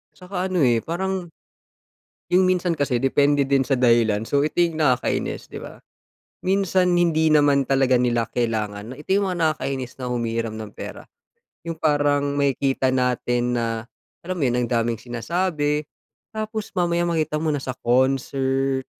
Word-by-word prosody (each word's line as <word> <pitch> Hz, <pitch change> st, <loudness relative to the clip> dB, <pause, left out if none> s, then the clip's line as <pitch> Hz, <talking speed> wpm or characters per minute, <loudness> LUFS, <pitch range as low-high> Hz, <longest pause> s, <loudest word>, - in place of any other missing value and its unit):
Tsaka 180 Hz, 0 st, -4 dB
ano, 185 Hz, -4 st, +1 dB
eh, 120 Hz, -3 st, +4 dB
parang, 185 Hz, +5 st, -3 dB, 1.0 s
yung 185 Hz, +1 st, +4 dB
minsan 180 Hz, -2 st, +1 dB
kasi 140 Hz, -5 st, 0 dB
depende 140 Hz, +1 st, +2 dB
din 135 Hz, -1 st, +3 dB
sa 135 Hz, -, -2 dB
dahilan. 115 Hz, -3 st, +3 dB
So, 140 Hz, 0 st, +2 dB
ito 155 Hz, +3 st, -1 dB
yung 170 Hz, -2 st, +2 dB
nakakainis, 130 Hz, -5 st, 0 dB
'di -, -, -8 dB
ba? -, -, -11 dB, 0.6 s
Minsan 190 Hz, -1 st, +2 dB
hindi 160 Hz, -2 st, +3 dB
naman 145 Hz, -2 st, +4 dB
talaga 135 Hz, -1 st, +3 dB
nila 120 Hz, -2 st, +1 dB
kailangan 110 Hz, -2 st, -2 dB
na -, -, -8 dB
ito 150 Hz, -, -13 dB
yung 200 Hz, -1 st, +1 dB
mga 180 Hz, -, -4 dB, 0.2 s
nakakainis 135 Hz, -3 st, -4 dB
na 125 Hz, -2 st, -5 dB
humihiram 115 Hz, -2 st, -2 dB
ng 110 Hz, -, -6 dB
pera. -, -, -8 dB, 0.6 s
Yung 165 Hz, -, -3 dB
parang 145 Hz, -1 st, +1 dB
makikita 135 Hz, -1 st, +1 dB
natin 125 Hz, -1 st, 0 dB
na 115 Hz, 0 st, -3 dB, 0.3 s
alam 185 Hz, +1 st, -4 dB
mo -, -, -3 dB
'yon, 120 Hz, -, 0 dB
ang 120 Hz, -, -2 dB
daming 115 Hz, -2 st, 0 dB
sinasabi. 150 Hz, +4 st, -1 dB, 0.5 s
Tapos 215 Hz, 0 st, -4 dB
mamaya 175 Hz, -1 st, +1 dB
makita 155 Hz, -2 st, -1 dB
mo 160 Hz, -, +1 dB
nasa 135 Hz, -3 st, -3 dB
concert, 135 Hz, +1 st, +1 dB
140 Hz, 155 wpm, -23 LUFS, 125-170 Hz, 1.0 s, eh